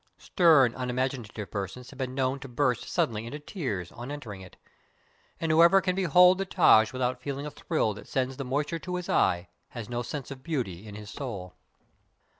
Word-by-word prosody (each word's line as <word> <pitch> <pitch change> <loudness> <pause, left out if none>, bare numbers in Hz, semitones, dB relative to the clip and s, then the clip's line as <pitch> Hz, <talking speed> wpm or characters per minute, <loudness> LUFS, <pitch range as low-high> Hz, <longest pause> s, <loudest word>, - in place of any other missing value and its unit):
Stern, 155 -9 +4
unimaginative 125 -5 -3
persons 100 - -5
have 135 - -14
been 130 -1 -3
known 135 0 0
to 140 - -8
burst 125 -1 0
sud - - +1
denly 110 0 -5
into 120 +6 -6
tears, 130 - -4
on 120 +3 -8
entering 115 -10 -7
it; 95 - -13 0.8
and 165 -1 0
whoever 170 +4 +7
can 185 -1 -1
behold 180 0 +5
the 195 - 0
Taj 110 - +5
without 125 -1 -2
feeling 140 +2 -4
a 150 - -5
thrill 145 -9 -1
that 105 - -11
sends 130 0 -1
the 140 - -3
moisture 145 +5 -2
to 180 +2 -5
his 180 -1 -5
eye, 90 0 +2 0.2
has 120 -3 -7
no 120 0 -2
sense 135 +2 -6
of 135 -1 -8
beauty 115 - -3
in 105 - -9
his 105 0 -9
soul. 100 -10 -6
130 Hz, 195 wpm, -28 LUFS, 110-150 Hz, 0.8 s, whoever